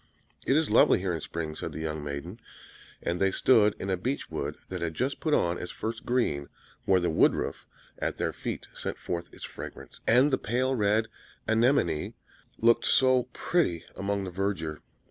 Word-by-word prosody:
"It 135 - +4
is 155 0 +2
lovely - - +6
here 90 -1 -1
in 80 - -3
spring!" 80 -1 -4
said - - -5
the - - -6
young 80 -1 -3
maiden. 75 +9 -6 0.6
And 85 +1 -1
they 95 - +4
stood 105 0 +4
in 95 - -3
a 95 - +1
beech 130 +10 -3
wood - - -3
that 90 -2 -4
had 80 -2 -2
just 135 +3 -1
put 155 -2 +2
on 85 0 +1
its 90 - -5
first 110 +1 -5
green, 95 - 0 0.4
where 95 -1 +4
the 85 -1 0
woodroof 80 - +1 0.2
[*] - - -26
at - - -1
their - - -1
feet - - -5
sent - - -4
forth 85 -1 -4
its - - -11
fragrance, - - -9
and 130 +5 +5
the 130 - +2
pale 130 +4 0
red 110 0 +2 0.4
anemony 110 - +2 0.4
looked 115 +1 +4
so 130 -2 +4
pretty 90 - 0
among 100 +1 -1
the 95 - -5
verdure. 85 -5 -2
100 Hz, 185 wpm, -28 LUFS, 85-120 Hz, 0.6 s, lovely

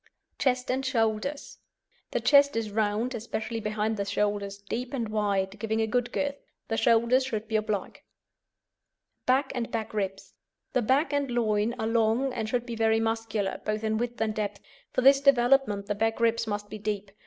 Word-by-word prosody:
CHEST 250 -1 +1
AND 260 +1 -1
SHOULDERS 230 +3 -1 0.5
The - - -1
chest 280 -2 +5
is 225 -2 -2
round, 215 +4 0
especially 225 0 -4
behind 215 0 -1
the 200 - -1
shoulders, 205 0 -1
deep 240 +6 -5
and 235 -4 -2
wide, 200 -2 -1
giving 220 0 -1
a 220 - +2
good 245 +2 -1
girth. 285 0 -2 0.3
The 225 - 0
shoulders 235 +3 +4
should 220 -4 -3
be 220 - -3
oblique. 215 -2 -2 1.2
BACK 265 +2 +3
AND 240 -2 -3
BACK 225 -2 -4
RIBS 195 -2 -3 0.4
The 250 - +2
back 270 +7 +2
and 285 -2 0
loin 225 -1 +1
are 220 - -2
long, 230 +3 +2
and 220 -3 -3
should 245 0 -1
be 235 -2 -5
very 225 0 +2
muscular, 225 -3 -1
both 215 +1 -2
in 220 0 0
width 240 0 -3
and 220 -1 0
depth; 210 -1 -3 0.3
for - - 0
this 275 +2 +6
development 250 -6 +3
the 205 - -1
back 225 +2 0
ribs 230 0 +2
must 205 -1 -3
be 215 - -6
deep. 205 -1 -3
225 Hz, 180 wpm, -28 LUFS, 210-245 Hz, 1.2 s, this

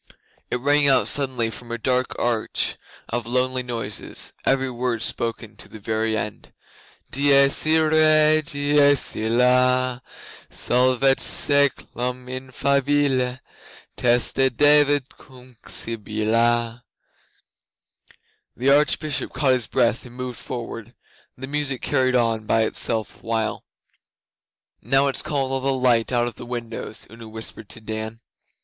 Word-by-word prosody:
It - - -1
rang 145 +3 +2
out 135 - +4
suddenly 130 -5 -1
from 115 +2 -9
a 120 - -2
dark 125 +2 -1
arch 115 -2 -1 0.3
of 115 -1 -3
lonely 130 +1 +1
noises 115 -4 -5
every 135 -1 +2
word 120 -2 -2
spoken 115 -2 -2
to - - -10
the 110 - -11
very 110 +1 -1
end: 105 -2 -5 0.6
'Dies 140 +1 +4
Irae, 155 -1 +4
dies 145 -2 +2
illa, 125 +2 +2 0.5
Solvet 130 +2 +2
saeclum 125 -3 +1
in 130 +1 -7
favilla, 135 -1 0 0.5
Teste 125 +2 +2
David 145 -2 +4
cum 125 -1 -16
Sibylla.' 115 +2 0 1.7
The 130 +3 +2
Archbishop 150 +1 +1
caught 135 -4 +2
his 125 -3 -1
breath 115 -3 +1
and 120 -1 -13
moved 125 -1 -6
forward. 115 -1 -7 0.4
The 130 - -6
music 140 -2 -3
carried 130 -3 +1
on 115 -3 0
by 110 +1 +2
itself 110 0 -1
a - - -24
while. 110 -1 -2 1.2
'Now 135 +1 +2
it's 135 - -1
calling 135 -3 -2
all 135 0 -2
the 135 +1 0
light 125 -3 +1
out 120 -1 +1
of 120 - -6
the - - -8
windows,' 115 -2 -6
Una 115 -1 -11
whispered 110 -1 -7
to - - -4
Dan. 110 +1 -6
125 Hz, 125 wpm, -22 LUFS, 115-135 Hz, 1.7 s, out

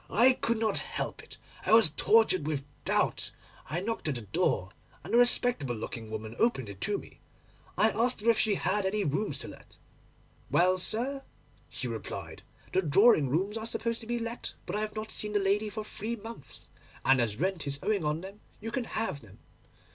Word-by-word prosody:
I 250 +4 +6
could 230 -2 0
not 220 -2 +1
help - - -4
it; - - -14 0.3
I - - +2
was 225 -9 +7
tortured 185 -2 +4
with 145 -3 -1 0.2
doubt. - - +1 0.4
I 165 +5 -1
knocked 225 -3 -2
at 145 - 0
the 120 - -4
door, 95 -2 0 0.3
and - - -7
a - - +6
respectable 245 - +2
looking 110 0 -6
woman 110 +1 -6
opened 135 - +2
it 100 -1 -10
to 205 - +1
me. - - -12 0.6
I 220 - +5
asked 235 0 +1
her 230 +2 +5
if 225 - 0
she 215 -2 +3
had 205 +1 0
any 200 +2 0
rooms 150 0 -1
to - - -5
let. - - -13 0.7
"Well, 180 +5 +4
sir," 255 +8 -1 0.5
she - - -4
replied, - - -6 0.3
"the 190 - +4
drawing 160 - +5
rooms 190 - 0
are 220 - -4
supposed 230 +1 -1
to 225 - -8
be 240 0 0
let; 230 +1 -4
but - - -3
I - - 0
have 215 0 -3
not 215 0 -4
seen 210 0 -3
the 205 - +3
lady 200 +2 +1
for 215 +1 -5
three 220 +2 -4
months, 225 - -9 0.4
and 135 -1 +5
as 110 -1 -1
rent 180 -3 -1
is 140 0 -1
owing 210 -5 +1
on 150 +2 0
them, 195 +3 -10 0.2
you 225 +2 -5
can 255 -1 -2
have 220 -12 -2
them." 100 -6 -16
205 Hz, 200 wpm, -30 LUFS, 145-225 Hz, 0.7 s, was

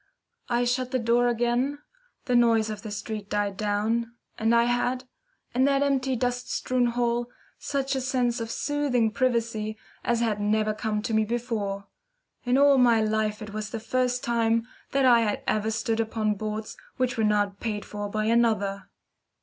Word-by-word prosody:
I 240 0 +2
shut 245 +1 0
the 260 - 0
door 240 0 +2
again, 240 +4 +1 0.5
the 250 -3 +1
noise 230 -2 +4
of 210 -1 -6
the 220 - -7
street 210 0 -5
died 205 -1 -1
down, 220 +3 -1 0.2
and 225 +2 +2
I 235 - +5
had, 245 +1 0 0.5
in 255 +2 +3
that 275 0 +3
empty, 270 -2 +1
dust 245 +1 -2
strewn 250 -1 +1
hall, 240 0 0 0.3
such 275 -1 -1
a 265 - -1
sense 250 -2 0
of 225 -1 -4
soothing 255 -4 0
privacy 230 -3 -1 0.3
as 235 -1 +1
had 220 -3 0
never 215 +1 +1
come 210 -1 -2
to 225 - -2
me 220 0 +3
before. 215 -4 -3 0.6
In 245 +1 +3
all 280 -1 +6
my 240 -2 +5
life 215 0 0
it 210 -1 -9
was 215 -1 -4
the 225 - -4
first 250 +2 0
time 230 0 +1 0.2
that 275 -1 +2
I 240 -2 +7
had 215 -3 -1
ever 215 0 0
stood 225 0 -1
upon 220 -1 0
boards 215 +1 -5 0.2
which 255 -1 0
were 225 - 0
not 205 -1 +1
paid 210 -3 -3
for 205 0 -5
by 215 +1 -1
another. 215 -4 +1
230 Hz, 175 wpm, -26 LUFS, 215-245 Hz, 0.6 s, I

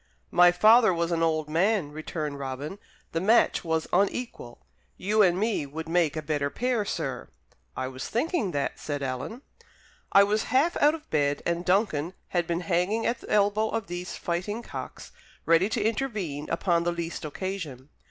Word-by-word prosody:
"My 175 0 +7
father 215 +4 +6
was 170 +1 -1
an 165 -1 0
old 155 -2 +1
man," 175 0 +1
returned 150 -1 -5
Robin. 140 +7 -5 0.3
"The 165 - -1
match 225 +5 +3
was 160 -1 0
unequal. 195 - -1 0.3
You 210 +3 +2
and 180 -2 +4
me 210 -9 0
would 160 +3 -6
make 165 -2 +1
a 155 - -3
better 145 -1 -1
pair, 245 - 0
sir." - - -4 0.5
"I 130 - -2
was 130 0 -6
thinking 285 - 0
that," 140 -4 -2
said 145 -2 -4
Alan. 135 - -4 0.7
I 200 - +7
was 210 +2 0
half 290 +7 +2
out 295 +2 +4
of 310 - -12
bed, 145 -2 +1
and 170 0 0
Duncan 180 -3 +1
had 175 -2 0
been 170 0 -1
hanging 180 +6 0
at 235 0 0
the - - -12
elbow 210 +1 +3
of 225 -1 -2
these 175 0 -5
fighting 190 +7 -3
cocks, - - -8 0.3
ready 165 +4 +4
to - - -1
intervene 210 - -2
upon 170 0 +1
the 175 - +1
least 170 -1 -5
occasion. 155 -5 -5
175 Hz, 170 wpm, -27 LUFS, 155-215 Hz, 0.7 s, My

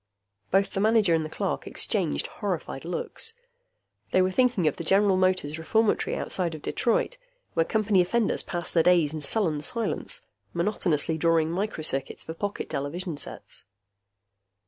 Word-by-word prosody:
Both 195 +1 +2
the - - -2
manager 215 -3 +4
and 160 -1 +2
the 155 - -5
clerk - - -3
exchanged 70 -1 0
horrified 175 -7 -4
looks. 455 - -3 0.7
They - - +3
were 185 - +1
thinking 240 -6 +2
of 150 - 0
the - - -4
General 195 +3 +4
Motors 185 -5 +1
Reformatory 220 +6 +1
outside 175 -4 -1
of 155 - -10
Detroit, - - 0 0.3
where 165 -1 +2
Company 215 -3 +3
offenders 215 +5 +1
passed 175 -1 -2
their 165 - +5
days 165 -3 +4
in 155 - -4
sullen 160 -3 +1
silence, 230 +9 -1 0.3
monotonously 170 -4 0
drawing 165 -1 +3
microcircuits 165 -7 -2
for 160 - -5
pocket 200 +4 -4
television 165 +5 -3
sets. - - -7
175 Hz, 145 wpm, -27 LUFS, 160-205 Hz, 0.7 s, their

